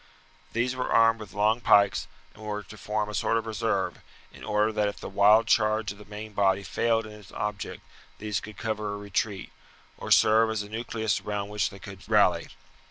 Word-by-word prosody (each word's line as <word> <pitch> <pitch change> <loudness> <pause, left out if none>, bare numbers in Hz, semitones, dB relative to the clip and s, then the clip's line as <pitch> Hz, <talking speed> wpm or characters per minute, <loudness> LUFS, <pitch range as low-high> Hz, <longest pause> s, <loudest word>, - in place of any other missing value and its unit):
These 120 +2 0
were 125 - -3
armed 115 0 +5
with 105 -3 -9
long 105 +3 +2
pikes, 100 -3 +4 0.3
and 105 - -16
were 105 -1 -4
to 110 - -12
form 105 0 -2
a 105 - -7
sort 115 - +1
of 115 - -2
reserve, 110 -3 -1 0.3
in - - -13
order 105 +1 +1
that 105 -1 0
if 100 - -5
the - - -7
wild 105 +3 +5
charge 110 -1 +2
of 100 - -12
the 105 - -12
main 105 +1 -8
body 100 -1 +2
failed 115 +2 0
in 110 - -10
its 105 -2 -14
object 105 -1 -4 0.3
these 105 -3 -2
could 105 +1 -11
cover 110 -2 -3
a - - -6
retreat, 100 0 -3 0.5
or - - -6
serve 110 +1 +5
as 110 -1 -2
a 105 - -11
nucleus 110 -2 -2
around 105 -1 -4
which 105 -1 0
they 100 - -12
could 95 -1 -12
rally. - - +3
105 Hz, 205 wpm, -27 LUFS, 105-110 Hz, 0.5 s, armed